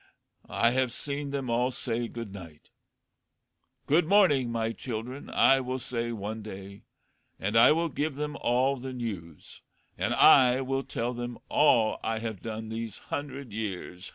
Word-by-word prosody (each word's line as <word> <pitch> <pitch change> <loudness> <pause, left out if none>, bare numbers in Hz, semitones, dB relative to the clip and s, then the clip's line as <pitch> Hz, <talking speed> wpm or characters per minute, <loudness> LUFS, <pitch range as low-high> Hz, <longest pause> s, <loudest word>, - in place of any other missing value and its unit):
I 115 - +2
have 130 -1 +1
seen 140 +3 -4
them 135 -3 -3
all 120 +2 +2
say 120 -2 -3
good 115 -4 -7
night. 85 -6 -12 1.1
Good 155 +3 +3
morning, 160 - +4
my 115 -1 -1
children, 125 +3 -6
I 135 - +5
will 130 0 -3
say 120 -2 -3
one 110 0 -5
day, 100 -1 -10 0.5
and 100 +3 -2
I 115 +4 +8
will 165 +1 0
give 145 0 -2
them 150 +1 -3
all 130 +3 +2
the 130 +1 -6
news, 95 -10 -7 0.4
and - - 0
I 125 -1 +7
will 135 +1 -1
tell 120 -2 -3
them 120 0 -5
all 120 -7 +4
I 110 0 -1
have 110 -4 -5
done 110 -1 -5
these 110 -1 -5 0.2
hundred 140 -3 -5
years. 95 -3 -5
120 Hz, 155 wpm, -28 LUFS, 110-135 Hz, 1.1 s, I